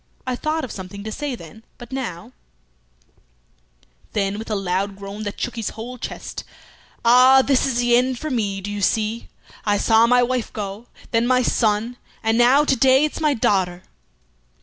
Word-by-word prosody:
I 255 -1 -1
thought 310 +4 -2
of 255 - -5
something 195 +1 -8
to 220 - -5
say 285 +3 -4
then, 220 +3 -13
but 240 0 -12
now 235 -6 -5 0.8
" - - -37
Then, 200 0 -1
with 225 - -7
a 215 - 0
loud 195 +1 -1
groan 200 +1 -8
that 205 - -5
shook 245 - -3
his 225 -3 -3
whole 240 +3 -8
chest, - - -6 0.6
"Ah! 255 +3 +7
this 275 -1 +2
is 250 -3 -1
the 240 0 +3
end 255 +1 +2
for 310 +4 -5
me, 200 -5 -1
do 205 +2 -5
you 205 0 -4
see! 220 +3 0 0.4
I 205 -1 +1
saw 225 +2 +4
my 245 +1 +4
wife 250 -1 -1
go, 210 +2 -6 0.2
then 230 +1 +2
my 255 0 +3
son, 225 +1 0 0.3
and 225 0 +2
now 250 +5 +5
to 270 - +2
day 265 +3 +4
it's 305 - -5
my 300 -2 +2
daughter." 185 -5 0
225 Hz, 185 wpm, -21 LUFS, 200-250 Hz, 0.8 s, Ah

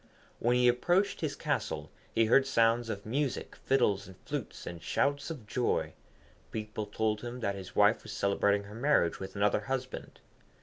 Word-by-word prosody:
When 120 +1 +2
he 125 0 +4
approached 175 +11 +2
his 155 -3 -1
castle - - -2 0.2
he 115 - +5
heard 135 +4 +5
sounds 115 -2 +3
of 100 -2 -4
music, 135 +4 -2
fiddles 105 -7 +1
and 95 -1 -13
flutes, - - -5
and 85 -1 -6
shouts 140 +1 0
of 145 -9 -7
joy. 120 +3 0 0.6
People 110 -1 -4
told 105 0 0
him 120 +1 -6
that 100 -3 0
his 95 -2 -9
wife - - +5
was - - -9
celebrating 100 +1 +2
her 100 +1 -11
marriage 115 - +2
with 95 - -7
another 105 +1 +2
husband. 130 +2 -5
115 Hz, 170 wpm, -31 LUFS, 100-130 Hz, 0.6 s, he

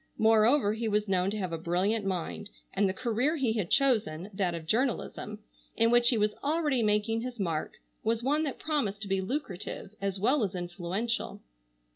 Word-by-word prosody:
Moreover 220 +1 +4
he 225 +1 -2
was 210 0 +1
known 185 -1 +2
to 210 - -2
have 185 -4 -3
a 165 - -2
brilliant 185 +6 +1
mind, 190 +2 -3 0.2
and 195 0 +2
the - - +1
career 245 - 0
he 260 -7 +1
had 210 -6 -2
chosen, 215 - +2
that 185 -3 0
of 165 -1 -7
journalism, 220 0 -1 0.4
in 230 0 +4
which 240 0 +5
he 240 - +3
was 210 0 +2
already 295 -4 +1
making 210 +1 +1
his 245 -1 -6
mark, 165 -5 -2 0.3
was 225 +1 0
one 290 +4 +2
that 275 - -4
promised 220 -10 -1
to - - -5
be 195 0 0
lucrative 195 - -4
as 195 -1 -2
well 255 +6 +3
as 190 -2 -2
influential. 185 +5 -3
215 Hz, 185 wpm, -29 LUFS, 190-240 Hz, 0.4 s, which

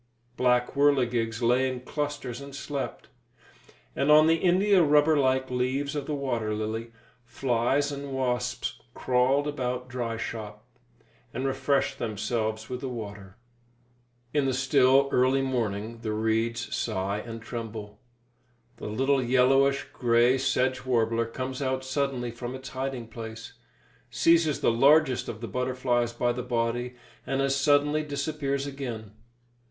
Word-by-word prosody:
Black 125 -1 +2
whirligigs 125 -5 +1
lay 125 +3 +3
in 125 -1 -6
clusters 145 -2 -4
and 140 0 -9
slept; 140 0 -5 0.9
and 140 - 0
on 155 +1 +8
the 165 +1 +4
india 190 +2 +4
rubber 150 0 +4
like 130 -2 +1
leaves 130 +3 -1
of 145 -2 -3
the 150 - -1
water 120 -6 -2
lily, 110 +2 -4 0.3
flies 125 +3 0
and 140 0 -6
wasps 125 -1 -2
crawled 130 +3 +2
about 125 -3 -3
dry 120 -2 -3
shop, 105 -2 -6 0.7
and 130 - -2
refreshed 135 +1 0
themselves 110 0 -2
with 125 +1 -5
the 135 - -3
water. 105 -4 -8 1.0
In 145 -2 +2
the 130 -2 0
still, 135 0 +4
early 130 +2 +3
morning 115 -3 -2
the 110 -2 -2
reeds 115 +2 -1
sigh 100 +2 -2
and 115 +1 -7
tremble. 110 -3 -7 0.8
The - - -7
little 135 +5 +1
yellowish 135 +2 +3
grey 120 +2 +3
sedge 130 -1 0
warbler 115 -2 +1
comes 130 +3 -5
out 130 -1 -1
suddenly 130 -3 -1
from 120 +2 -6
its 130 0 -8
hiding 130 -3 -4
place, 115 0 -8 0.6
seizes 165 -3 +3
the - - +3
largest 135 +2 +4
of 110 - -7
the 115 - -4
butterflies 125 +1 0
by 120 0 0
the 125 +1 -3
body, 120 +1 -2 0.3
and 135 - -1
as 135 0 +1
suddenly 145 +2 +3
disappears 140 -1 -2
again. 125 -7 -6
125 Hz, 135 wpm, -27 LUFS, 115-140 Hz, 1.0 s, on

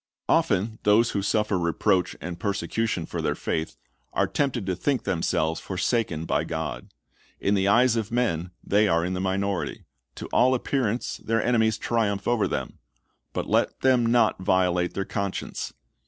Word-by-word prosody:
Often 110 +4 +1
those 110 +3 +4
who 100 - -1
suffer 105 -1 +1
reproach 90 +2 +1
or 90 +2 -4
persecution 100 0 -2
for - - -4
their - - 0
faith 80 0 -3 0.4
are - - +2
tempted 130 -7 -1
to 95 -1 -1
think 135 +7 0
themselves 80 -1 0
forsaken 95 -4 -1
by - - +1
God. 80 -1 -5 0.5
In 100 - +1
the 95 -1 +2
eyes 120 +3 +4
of 115 -1 -2
men 100 -9 0
they 105 +1 +3
are 85 -2 +2
in 90 - -2
the 90 - -2
minority. 95 0 -2 0.3
To - - -7
all 130 +1 +4
appearance 125 -3 -1
their 115 -1 -1
enemies 110 -3 +2
triumph 105 -4 -1
over 120 -4 +2
them. - - -4 0.5
But - - -3
let - - +1
them 130 -3 +4
not 120 -3 +3
violate 90 -1 +1
their 95 - -1
conscience. 100 -1 -4
100 Hz, 160 wpm, -25 LUFS, 90-115 Hz, 0.5 s, those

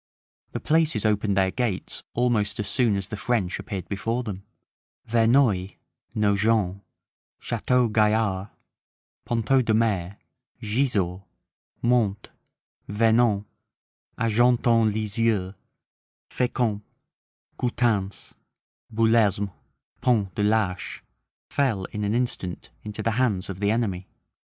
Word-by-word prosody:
The - - -2
places 155 -9 +1
opened 105 -2 +1
their 95 -1 +3
gates 120 -6 -2
almost 110 -4 +1
as 105 - -2
soon 115 -3 +2
as 100 0 -4
the - - -4
French 105 -4 -1
appeared 95 -5 -5
before 115 +5 -2
them; 100 -5 -6 0.6
Verneuil, 115 -4 +3 0.4
Nogent, 100 -2 +2 0.6
Chateau 125 +1 +1
Gaillard, 105 -2 +1 0.8
Ponteau 120 +3 +2
de 115 -3 +1
Mer, 100 -4 0 0.4
Gisors, 105 -6 0 0.6
Mante, 120 -4 +1 0.6
Vernon, 110 -1 +2 0.7
Argentan 115 0 +3
Lisieux, 105 -2 0 0.8
Fecamp, 120 -4 0 0.8
Coutances, 115 -6 -1 0.6
Belesme, 110 -3 +2 0.5
Pont 105 -7 +1
de - - -2
l'Arche, 105 -3 0 0.5
fell 115 -9 0
in 105 - -4
an 105 +2 0
instant 95 - -3
into 105 0 -5
the 115 - +1
hands 100 -7 0
of 95 - -8
the 100 0 +1
enemy. 100 -5 -1
110 Hz, 100 wpm, -25 LUFS, 100-120 Hz, 0.8 s, their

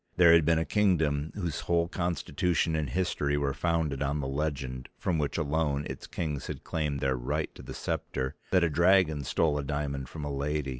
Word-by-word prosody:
There 85 -2 +8
had 80 -2 +6
been 85 +1 +4
a 80 - +1
kingdom 80 -8 +2
whose 85 -7 -2
whole 85 -1 +1
constitution 85 -1 0
and 75 -4 -1
history 75 -2 0
were 70 -1 0
founded 80 -3 0
on 70 +1 0
the 70 - -2
legend, 70 -3 -3
from 85 -3 0
which 75 - -1
alone 75 -2 0
its - - -7
kings 75 -5 -3
had - - -6
claimed 75 -4 -2
their 65 -1 +1
right 70 +6 -2
to - - -11
the - - -8
scepter, 65 0 -3 0.2
that 90 -2 +4
a 85 - +3
dragon 85 -2 +4
stole 75 +2 +1
a - - -2
diamond 70 -1 -3
from 75 0 -6
a 70 - -3
lady. 75 0 -1
75 Hz, 200 wpm, -29 LUFS, 70-85 Hz, 0.2 s, There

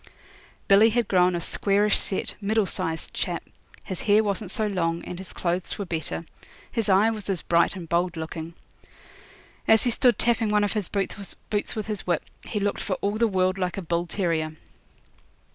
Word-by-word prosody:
Billy 205 +3 +7
had 235 +1 +1
grown 180 -1 +4
a - - 0
squarish 200 +4 +2
set, 190 - -2
middle 215 +1 +2
sized 160 -2 -3
chap; - - -2 0.4
his 185 -3 -4
hair 210 +1 +4
wasn't 200 -1 -2
so 220 +2 0
long, 170 -4 -1
and 180 - -6
his 190 - -8
clothes 175 0 -2
were 200 - -3
better; 165 -1 -4 0.5
his 225 -3 -1
eye 200 +4 +5
was 210 -3 -6
as 190 -3 -1
bright 170 +2 +3
and 175 -3 -7
bold 170 +1 0
looking. 160 +1 -6 1.1
As 220 -1 +6
he 245 - +2
stood 245 +1 +3
tapping 230 -2 +2
one 210 0 +3
of 205 - 0
his 210 -5 -1
boots 200 +1 -3
with 215 -2 -3
his 210 -3 -5
whip, 175 -3 +1 0.2
he 210 - -2
looked 205 0 -1
for 185 - -1
all 205 +2 -1
the 230 - +4
world 185 -1 +1
like 180 0 -1
a - - -2
bull 170 +1 -1
terrier. 165 -4 -1
195 Hz, 185 wpm, -25 LUFS, 175-210 Hz, 1.1 s, Billy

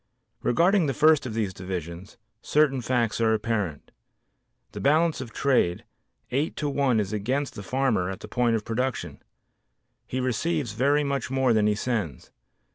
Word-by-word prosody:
Regarding 175 - +3
the 135 - -1
first 155 -3 +4
of 110 - -6
these 105 -4 -1
divisions, 90 0 -6 0.2
certain 145 -3 +2
facts 120 -3 0
are 110 -1 +3
apparent. 105 -8 -3 0.8
The - - -7
balance 155 +1 +2
of 120 -3 -7
trade, 125 -12 +1 0.5
eight 140 +5 -1
to 150 - -2
one 135 -4 +2
is 105 0 -2
against 130 +7 -1
the 105 - -7
farmer 115 -4 0
at 95 - -6
the - - -8
point 120 -2 +1
of 110 - -3
production; 125 +3 -3 0.9
he 130 - -3
receives 130 +2 -1
very 140 +7 +2
much 140 -2 -2
more 130 -2 +2
than 105 -1 +3
he 105 - +2
sends. 105 - -3
125 Hz, 160 wpm, -26 LUFS, 105-140 Hz, 0.9 s, first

